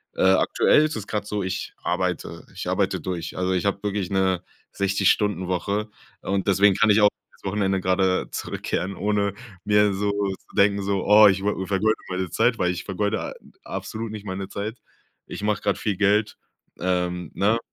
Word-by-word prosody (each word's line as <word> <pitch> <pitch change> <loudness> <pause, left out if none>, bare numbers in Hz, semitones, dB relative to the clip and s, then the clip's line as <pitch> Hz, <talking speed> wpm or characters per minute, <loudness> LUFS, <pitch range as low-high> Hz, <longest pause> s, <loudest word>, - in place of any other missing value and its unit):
Äh, - - 0
aktuell 95 +9 +4
ist 155 - -3
es 105 -3 -6
grade 105 -1 -2
so, 105 -1 -2
ich 95 +1 -4
arbeite 90 +1 -2
ich - - -5
arbeite - - 0
durch. 85 -3 -5
Also 90 0 0
ich 90 0 -1
habe 100 0 0
wirklich 100 -3 -2
'ne 95 -2 +1 0.3
60 100 0 +2
Stunden 105 -3 -1
Woche 100 +4 -1 0.3
und 95 0 -2
deswegen 100 0 +4
kann 110 - +3
ich 105 - +5
auch 105 - +8 0.2
aufs - - -26
Wochenende 95 -1 0
grade 95 0 +1
zurückkehren, 95 +2 -3
ohne 100 -1 0 0.3
mir 105 -1 +4
so 100 +1 0
zu 100 -2 -4
denken 100 0 +4
so: 100 -1 -1
„Oh, 105 +1 +8
ich 95 -1 +2
wo 100 -2 -1
vergeude 100 +3 +1
meine 95 -1 -2
Zeit, 115 +5 +2
weil 90 - +2
ich 90 0 -5
vergeude 100 +1 -1
a - - -5 0.3
absolut 110 0 -5
nicht 105 -1 -8
meine 95 -1 -5
Zeit. 105 +4 -5 0.5
Ich - - -7
mache 105 0 0
grade 100 -1 0
viel 105 -3 -1
Geld.", 105 +2 +2 0.4
ähm, 90 -2 -1
ne? 105 +4 +2
100 Hz, 185 wpm, -24 LUFS, 95-105 Hz, 0.5 s, auch